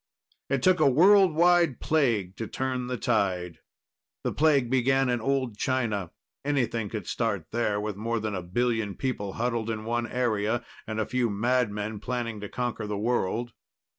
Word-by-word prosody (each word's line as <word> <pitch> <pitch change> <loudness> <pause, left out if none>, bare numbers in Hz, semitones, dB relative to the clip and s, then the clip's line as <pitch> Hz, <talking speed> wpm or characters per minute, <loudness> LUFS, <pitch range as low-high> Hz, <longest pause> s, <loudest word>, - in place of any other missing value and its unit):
It 135 -2 0
took 185 +2 +4
a - - +5
world 185 +4 +6
wide 170 -5 +4
plague 115 - +1
to 115 - -4
turn 130 0 -2
the 125 0 -2
tide. 95 -7 0 0.6
The - - 0
plague 145 -5 +3
began 130 +1 +2
in 120 -2 0
old 130 -3 -1
China; 115 -9 -1 0.3
anything 120 -7 0
could 105 -5 -5
start 105 -8 -2
there, 110 -3 0
with 105 -1 -3
more 115 +2 -1
than 110 -1 -3
a 95 - -2
billion 110 +3 -1
people 105 -7 -3
huddled 115 -1 -1
in 110 -1 -3
one 120 +1 -1
area 115 -2 0 0.2
and 110 0 -3
a 110 - +1
few 125 -2 0
madmen 110 -1 0
planning 115 -1 -3
to 105 -1 -6
conquer 120 -3 -3
the 105 -1 -3
world. 120 +1 -1
115 Hz, 165 wpm, -27 LUFS, 105-130 Hz, 0.6 s, world